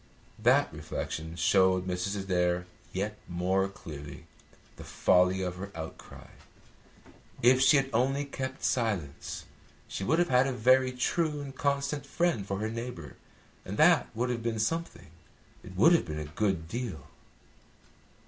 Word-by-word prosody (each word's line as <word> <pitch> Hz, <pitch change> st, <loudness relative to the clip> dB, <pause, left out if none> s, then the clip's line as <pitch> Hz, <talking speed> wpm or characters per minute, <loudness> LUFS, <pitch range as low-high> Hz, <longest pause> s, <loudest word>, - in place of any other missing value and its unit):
That -, -, +3 dB
reflection 80 Hz, +1 st, -5 dB
showed 95 Hz, +2 st, +3 dB
Mrs. 95 Hz, +2 st, -2 dB
Adair 90 Hz, -2 st, 0 dB, 0.3 s
yet 105 Hz, +3 st, -3 dB
more 95 Hz, +2 st, 0 dB
clearly 75 Hz, -7 st, -10 dB, 0.5 s
the -, -, -9 dB
folly 90 Hz, +1 st, +2 dB
of 90 Hz, -1 st, -3 dB
her 100 Hz, +1 st, -7 dB
outcry. 80 Hz, -1 st, -9 dB, 1.2 s
If 130 Hz, +2 st, +6 dB
she 135 Hz, +3 st, +6 dB
had 135 Hz, 0 st, +1 dB
only 135 Hz, +5 st, +1 dB
kept 130 Hz, -1 st, -5 dB
silence, 100 Hz, -, -2 dB, 0.4 s
she -, -, -5 dB
would 160 Hz, +11 st, +2 dB
have 175 Hz, 0 st, +2 dB
had 125 Hz, +1 st, +4 dB
a 135 Hz, -, -1 dB
very 130 Hz, +2 st, +4 dB
true 150 Hz, +4 st, 0 dB
and 135 Hz, -1 st, -8 dB
constant 140 Hz, +1 st, -1 dB
friend 170 Hz, -, 0 dB
for 100 Hz, -, -2 dB
her 110 Hz, -, -1 dB
neighbour, 115 Hz, -, -6 dB, 0.5 s
and 100 Hz, -, -6 dB
that 160 Hz, -2 st, +5 dB
would 125 Hz, +2 st, 0 dB
have 120 Hz, -1 st, -3 dB
been 115 Hz, -1 st, -2 dB
something. 110 Hz, -, -2 dB, 0.5 s
It 95 Hz, -, -12 dB
would 115 Hz, -, +6 dB
have 170 Hz, -, +3 dB
been 75 Hz, -2 st, -5 dB
a 75 Hz, -, -4 dB
good 85 Hz, +1 st, -1 dB
deal. 105 Hz, -, -5 dB
105 Hz, 150 wpm, -29 LUFS, 90-130 Hz, 1.2 s, If